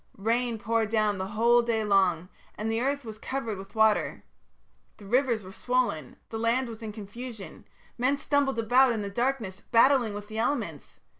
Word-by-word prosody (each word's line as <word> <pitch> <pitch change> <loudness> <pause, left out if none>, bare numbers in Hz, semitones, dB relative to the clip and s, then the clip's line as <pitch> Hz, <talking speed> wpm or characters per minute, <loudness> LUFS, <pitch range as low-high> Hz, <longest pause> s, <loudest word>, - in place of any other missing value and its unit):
Rain 230 +3 0
poured 220 0 0
down 215 -3 +1
the 190 - -3
whole 235 +4 +4
day 230 -2 0
long, 185 -4 +2 0.3
and 220 +1 -3
the 225 +1 0
earth 280 +1 -1
was 215 -1 -8
covered 230 -7 -4
with 195 +3 -11
water; 220 -1 +2 0.7
the 205 - -13
rivers 240 0 +1
were 185 - -10
swollen; 240 - -1 0.2
the 225 - -4
land 235 +3 +1
was 230 -1 -9
in 220 -1 -5
confusion; 215 +1 -9 0.3
men 265 +3 +2
stumbled 280 -2 +1
about 245 +3 +4
in 215 -2 -3
the 200 - -5
darkness, 235 -4 -2
battling 235 -2 +4
with 205 0 -7
the 220 +1 -5
elements. 285 +6 -3
225 Hz, 175 wpm, -27 LUFS, 210-245 Hz, 0.7 s, whole